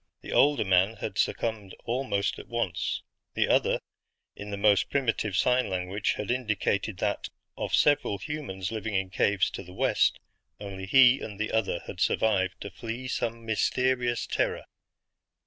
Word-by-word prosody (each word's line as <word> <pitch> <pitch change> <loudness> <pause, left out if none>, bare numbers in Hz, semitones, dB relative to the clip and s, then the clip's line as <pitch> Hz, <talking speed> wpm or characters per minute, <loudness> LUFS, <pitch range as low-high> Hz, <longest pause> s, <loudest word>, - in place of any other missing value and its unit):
The - - -8
older 145 -5 +4
man 95 +3 +3
had 100 -3 -5
succumbed 110 -4 -1
almost 115 -5 -1
at - - -10
once; 115 -8 -2 0.3
the - - +2
other, - - +3 0.6
in 105 - -8
the 100 - -4
most 100 -1 +3
primitive 115 -7 0
sign 125 +1 +2
language, 95 +2 -1
had 105 +2 -3
indicated 110 -4 -1
that, 100 +2 -2 0.3
of - - -1
several 145 -8 +3
humans 95 -7 -5
living 110 -1 -3
in 95 -1 -1
caves 100 0 +2
to - - -6
the 90 -1 -12
west, - - +2 0.4
only 95 -2 -7
he 130 +3 +6
and 105 -2 -7
the 110 - -1
other 110 -5 0
had - - -8
survived 95 -4 +1
to 100 - -6
flee 120 +3 -6
some 115 -2 -3
mysterious 120 +2 +1
terror. - - -1
105 Hz, 155 wpm, -28 LUFS, 95-120 Hz, 0.6 s, he